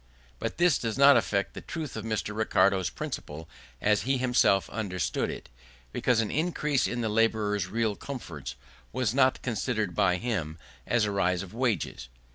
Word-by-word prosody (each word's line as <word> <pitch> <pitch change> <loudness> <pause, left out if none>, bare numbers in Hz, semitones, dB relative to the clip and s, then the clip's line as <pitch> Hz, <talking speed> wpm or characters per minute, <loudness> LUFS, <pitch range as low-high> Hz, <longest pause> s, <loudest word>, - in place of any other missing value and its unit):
But - - -4
this 175 -5 +4
does 115 0 -3
not 140 0 +8
affect 100 -4 +1
the - - -7
truth 155 -6 -6
of 110 - -4
Mr. 110 -1 -2
Ricardo's 100 -3 +2
principle 80 +2 -6 0.3
as 105 0 +2
he 135 +3 +1
himself 125 -6 +3
understood 95 -5 -2
it; - - -7 0.4
because 120 - +2
an 110 - -2
increase 150 -3 0
of 120 - -3
the 115 - 0
labourer's 105 -3 +1
real 110 +1 0
comforts 75 - -7 0.4
was 120 -3 0
not 130 -1 +3
considered 110 -5 -1
by 90 0 +3
him 90 -8 -3 0.3
as 115 -3 +2
a 105 - -1
rise 90 -2 +1
of 100 - -11
wages. 110 - -1
110 Hz, 165 wpm, -28 LUFS, 95-125 Hz, 0.4 s, not